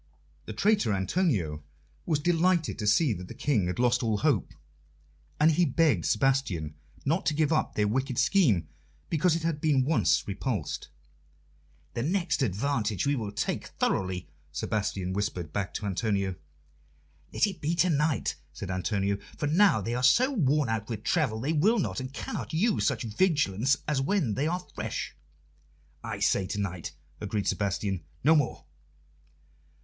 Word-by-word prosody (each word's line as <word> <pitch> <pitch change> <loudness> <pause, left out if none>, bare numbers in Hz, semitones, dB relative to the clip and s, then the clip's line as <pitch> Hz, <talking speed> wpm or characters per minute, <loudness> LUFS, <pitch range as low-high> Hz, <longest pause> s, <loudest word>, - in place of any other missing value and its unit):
The - - -5
traitor 205 - +2
Antonio 95 - 0 0.4
was 160 -4 +2
delighted 170 +1 +1
to 105 - -2
see 125 +4 +4
that 90 -1 -7
the - - -9
King 110 -11 +1
had 90 - -3
lost 120 +1 +2
all 110 -3 +1
hope, - - +1 0.9
and 155 +2 +6
he 170 +3 +3
begged 140 - +2
Sebastian 105 - +1 0.3
not 160 +7 +1
to 150 - +2
give 155 0 +2
up 155 - 0
their 105 -1 +2
wicked 130 +3 -1
scheme 130 - +3 0.4
because 165 +1 +3
it 165 - -3
had 160 -3 -1
been 140 -5 +3
once 155 +2 +2
repulsed. 100 - -3 1.1
"The - - -2
next 175 +4 0
advantage 110 -1 0
we 140 +1 +2
will 110 -5 -3
take - - -2
thoroughly," 95 -1 -1 0.2
Sebastian 95 +3 -2
whispered 90 -5 -3
back 100 -1 -2
to 105 - -3
Antonio. 100 -1 0 1.0
"Let - - +3
it 195 -3 -5
be 160 +3 0
to 175 +1 +3
night," 150 0 0 0.2
said - - -6
Antonio, 100 +2 -1 0.2
"for - - -2
now 165 - +4
they 115 +5 -3
are 125 - -1
so 240 - +5
worn 150 - +2
out 110 0 -2
with 110 -2 -4
travel 135 -10 +1
they 140 +7 -1
will 200 +10 +3
not 190 - -1
and 130 0 -5
cannot 145 - -5
use 210 +6 +2
such 125 -5 0
vigilance 135 - +2
as 145 -3 +1
when 145 - +1
they 140 +8 0
are 180 +2 -2
fresh." - - -4 0.9
"I 110 -2 -4
say 100 -1 +1
to 105 +1 -3
night," 90 -6 -4 0.2
agreed 105 -1 -2
Sebastian. 100 -3 -1 0.2
"No 155 +4 +6
more." 145 -5 0
130 Hz, 160 wpm, -28 LUFS, 100-160 Hz, 1.1 s, and